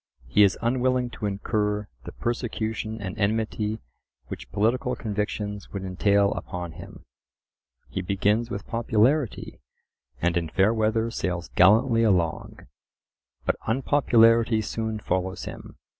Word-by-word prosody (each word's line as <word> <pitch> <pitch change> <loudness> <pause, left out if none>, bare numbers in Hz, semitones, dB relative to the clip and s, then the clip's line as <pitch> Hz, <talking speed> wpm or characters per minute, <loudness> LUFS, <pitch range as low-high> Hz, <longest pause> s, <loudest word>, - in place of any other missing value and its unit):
He 65 +12 +3
is 100 -2 +5
unwilling 125 0 +1
to 105 - -4
incur 105 +1 -1 0.2
the - - -6
persecution 110 -2 -3
and 95 -3 -5
enmity 110 0 -1 0.5
which - - -8
political 125 +4 +1
convictions 105 -2 -4
would 100 -1 -5
entail 100 +2 +2
upon 90 -2 -5
him. 80 - -12 0.8
He 95 - -4
begins 105 +5 +1
with 100 - -5
popularity, 115 +3 0 0.6
and 85 +3 +1
in 85 -2 -1
fair 100 +6 +3
weather 110 +1 +1
sails 90 -5 -3
gallantly 115 +5 +4
along. 90 -7 0 0.8
But - - +1
unpopularity 115 -3 +4
soon 110 0 -3
follows 95 -2 -2
him. - - -9
105 Hz, 120 wpm, -25 LUFS, 100-115 Hz, 0.8 s, is